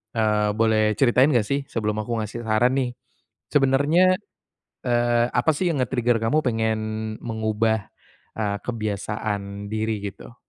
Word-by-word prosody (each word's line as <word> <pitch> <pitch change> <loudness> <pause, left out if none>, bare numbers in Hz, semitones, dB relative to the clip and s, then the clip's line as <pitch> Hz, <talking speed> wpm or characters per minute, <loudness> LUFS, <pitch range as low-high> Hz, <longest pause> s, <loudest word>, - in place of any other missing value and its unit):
eee, 105 -1 +2
boleh 110 -1 +2
ceritain 130 +1 +4
enggak 120 -7 +3
sih 140 +6 -1
sebelum 105 -1 -2
aku 115 +2 -2
ngasih 115 +2 -6
saran 115 +4 +3
nih. 125 -2 -1 0.6
Sebenernya, 145 +7 +4 0.7
eee, 120 0 +2
apa 125 +6 +2
sih 175 +2 +1
yang 145 - -2
nge-trigger 120 -2 +1
kamu 140 +8 +2
pengen 110 -2 0 0.4
mengubah, 110 -2 0 0.5
eee, 100 -2 -1
kebiasaan 105 -2 -4
diri 110 -1 -2
gitu? 115 +5 -14
115 Hz, 130 wpm, -24 LUFS, 110-125 Hz, 0.7 s, ceritain